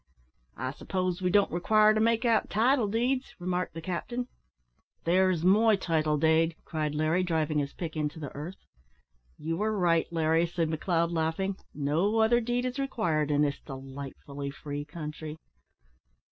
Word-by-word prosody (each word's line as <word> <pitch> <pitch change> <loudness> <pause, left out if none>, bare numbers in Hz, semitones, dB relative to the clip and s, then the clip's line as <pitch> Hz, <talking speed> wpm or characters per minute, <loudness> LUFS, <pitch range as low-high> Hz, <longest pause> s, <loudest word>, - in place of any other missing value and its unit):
"I 130 +2 -3
suppose 185 +4 -2
we 180 - +1
don't 200 +2 +3
require 215 +5 +4
to 215 - +1
make 230 +2 +2
out 230 -2 +2
title 235 +2 +3
deeds!" 250 +5 -1
remarked 180 -1 -2
the 165 - -6
captain. 240 +8 -3 0.7
"There's 180 -1 +2
my 215 +3 +5
title 155 -5 0
dade," 160 +2 +3
cried 155 -2 -2
Larry, 155 +4 +2
driving 160 -4 0
his 140 -1 -3
pick 165 -3 -5
into 150 0 -2
the 145 -4 -6
earth. 160 +7 -8 0.7
"You 165 +4 -3
are 215 0 0
right, 170 -3 +2
Larry," 165 +1 +2
said 165 -1 -1
McLeod, 170 +1 0
laughing, 165 +4 -1 0.2
"no 155 +10 +1
other 225 +2 +4
deed 245 +2 -1
is 255 +2 -3
required 175 - 0
in 145 0 +3
this 140 -1 -1
delightfully 140 +1 -7
free 145 +1 -6
country." 150 0 -7
170 Hz, 155 wpm, -29 LUFS, 155-210 Hz, 0.7 s, my